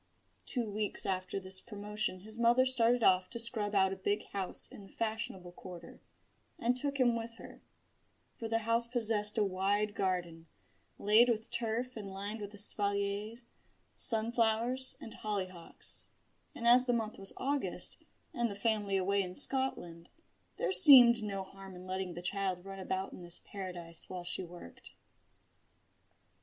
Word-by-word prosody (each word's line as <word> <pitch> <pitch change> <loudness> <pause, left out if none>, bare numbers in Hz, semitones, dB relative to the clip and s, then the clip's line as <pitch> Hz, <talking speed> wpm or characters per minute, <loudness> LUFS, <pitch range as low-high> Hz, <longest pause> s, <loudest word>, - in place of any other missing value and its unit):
Two 245 -4 -3
weeks 210 0 +1
after 185 0 -3
this 190 0 -3
promotion 210 -3 -5
his 220 +3 -10
mother 240 +2 +3
started 245 -2 +3
off 185 0 +2
to - - -8
scrub 220 -3 +3
out 190 -1 +2
a - - -6
big 205 +2 -3
house 195 -2 0
in - - -13
the 195 - -15
fashionable 215 -5 -5
quarter, 175 -1 -13 0.6
and 240 +2 -1
took 280 +2 -2
him 240 -2 +2
with 230 0 -7
her: - - -14 0.7
for 230 - -8
the 225 0 -1
house 230 +1 0
possessed 220 -3 +4
a 215 - +2
wide 200 +2 -1
garden, 175 -4 -4 0.5
laid 220 +4 +3
with 225 0 -3
turf 240 +2 -3
and 205 -3 -8
lined 200 +3 -7
with 205 -1 -8
espaliers, 205 +2 +3 0.5
sunflowers, 230 +2 +2
and 225 - -11
hollyhocks, 185 -5 -7 0.5
and 235 - -4
as 250 +1 +5
the 245 - +1
month 220 -2 -4
was 195 0 -10
August, 280 +1 -1 0.4
and 235 -1 -2
the 200 - -7
family 205 -2 -1
away 200 +2 0
in 180 -1 -7
Scotland, 175 -11 0 0.5
there - - -2
seemed 245 -9 +7
no 200 -2 -5
harm 195 0 -13
in 180 +1 -12
letting 185 -1 -5
the 175 - -9
child 190 -1 -4
run 195 0 -9
about 190 +1 -5
in - - -11
this 175 0 -1
paradise 175 -4 +3
while 180 -1 -7
she 180 +2 -5
worked. 175 - -14
205 Hz, 155 wpm, -31 LUFS, 190-230 Hz, 0.7 s, seemed